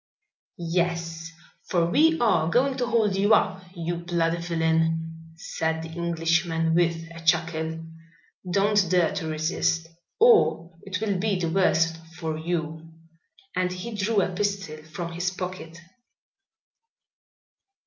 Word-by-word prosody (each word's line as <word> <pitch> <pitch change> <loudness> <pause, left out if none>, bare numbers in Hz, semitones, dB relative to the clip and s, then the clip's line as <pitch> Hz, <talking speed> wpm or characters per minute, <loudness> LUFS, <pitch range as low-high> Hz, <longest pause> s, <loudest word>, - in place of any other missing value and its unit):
"Yes, 170 -1 -2 0.4
for 175 -2 +2
we 320 - +3
are 170 -9 +3
going 260 +8 +2
to 245 -2 -1
hold 220 -4 +2
you 205 +3 +5
up, 190 - 0
you 170 0 -3
bloody 170 -1 0
villain," 165 -1 -1
said 160 0 -2
the 165 - -7
Englishman, 165 0 0
with 165 -1 +1
a 165 - -9
chuckle. 160 -1 0 0.7
"Don't 200 -1 +3
dare 180 -1 +3
to 190 -5 -3
resist, 160 +1 0 0.3
or 425 - +4
it 190 -2 -4
will 200 -4 0
be 200 -1 0
the 165 -2 -1
worse 165 -3 +2 0.2
for 160 -2 -3
you," 160 0 -4 0.6
and 180 0 0
he 185 +6 -6
drew 205 0 +1
a 180 - -3
pistol 200 -5 -2
from 165 +2 -6
his 175 +2 -1
pocket. 180 -2 -7
170 Hz, 130 wpm, -25 LUFS, 165-190 Hz, 0.7 s, you